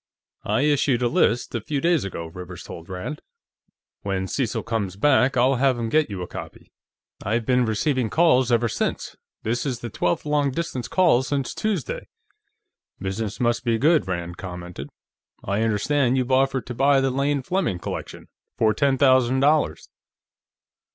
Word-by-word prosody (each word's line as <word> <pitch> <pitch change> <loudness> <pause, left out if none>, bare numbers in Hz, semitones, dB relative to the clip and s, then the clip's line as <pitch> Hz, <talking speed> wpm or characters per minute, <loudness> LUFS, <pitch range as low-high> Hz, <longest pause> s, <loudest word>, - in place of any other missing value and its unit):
"I - - +1
issued 140 -4 +2
a - - +3
list, 120 0 +1
a 115 - -2
few 145 +5 -2
days 170 +2 +2
ago," 90 -4 -5
Rivers 90 +1 -9
told 85 +1 -10
Rand. 95 +11 -5 0.8
"When 95 -1 -2
Cecil 115 +4 -2
comes 110 -5 -2
back, 135 +3 +3
I'll 130 +2 +3
have 130 -1 +2
him 115 -1 -2
get 155 +2 +2
you 95 -3 -5
a - - -6
copy. - - -10 0.5
I've 115 +3 -1
been 125 0 +3
receiving 125 +2 0
calls 130 -6 +3
ever 120 0 +3
since; 110 - -3 0.3
this 120 +2 -1
is 125 -4 -3
the 120 - -6
twelfth 90 +6 -1
long 150 -1 +1
distance 130 -3 -4
call 175 -9 +3
since 135 -1 -2
Tuesday." 345 - -3 0.9
"Business 100 +2 -4
must 120 0 +1
be 115 -2 +1
good," 155 - +3
Rand 85 -1 -4
commented. 90 -6 -7 0.5
"I 100 +2 -1
understand 120 +4 +1
you've 130 0 -1
offered 130 -2 +2
to 125 - -6
buy 135 +3 +4
the 135 0 +1
Lane 140 +1 0
Fleming 180 - -1
collection. - - -7 0.3
For 110 -1 +3
ten 140 +1 +1
thousand 130 -1 +4
dollars." 150 +2 +2
125 Hz, 165 wpm, -23 LUFS, 105-140 Hz, 0.9 s, buy